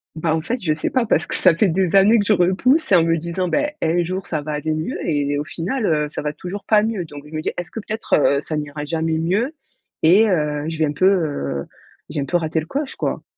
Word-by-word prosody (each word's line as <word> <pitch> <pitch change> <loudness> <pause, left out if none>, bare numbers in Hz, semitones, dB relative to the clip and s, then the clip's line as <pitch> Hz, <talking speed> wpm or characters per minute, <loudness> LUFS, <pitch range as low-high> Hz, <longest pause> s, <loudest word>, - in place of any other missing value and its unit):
Bah, 160 0 0
en 160 - -1
fait, 235 +10 -3
je 160 -5 +1
sais 155 - -3
pas 255 -3 +1
parce - - +2
que - - -6
ça 185 -3 +4
fait 195 +3 +3
des 185 +1 +1
années, 205 +4 +6
que 205 - 0
je 210 - +4
repousse 205 - +2
et - - +7
en 170 - +5
me 165 0 +2
disant: 170 +3 -2
«Beh, 290 - 0
un 175 +2 +2
jour 185 +2 -4
ça 155 -3 -2
va 155 +1 -5
aller 150 +1 -2
mieux 155 +1 -3
et 145 -2 0
au - - -2
final, 185 - -3
heu, 150 -2 +1
ça - - -5
va 150 0 -3
toujours 180 +6 -7
pas 210 -1 +4
mieux». 220 -4 -1
Donc 145 -2 -10
je 150 - -14
me 155 - -2
dis: - - -1
«Est-ce 175 -1 -5
que - - -5
peut-être, 220 +1 -5
heu, 140 -1 +3
ça 155 +2 -5
n’ira 150 0 -4
jamais 160 +1 -1
mieux 200 - 0 0.5
et 195 +7 +6
heu, 150 -4 0
je 165 - -5
vais 160 - +2
un 145 - -1
peu, 165 +6 +1
heu, 145 - -1 0.4
j'ai 150 -1 -3
un - - -2
peu 175 - +1
raté 160 -1 -1
le 155 - -6
coche, 280 - -3
quoi?» - - -3
165 Hz, 275 wpm, -21 LUFS, 155-195 Hz, 0.5 s, et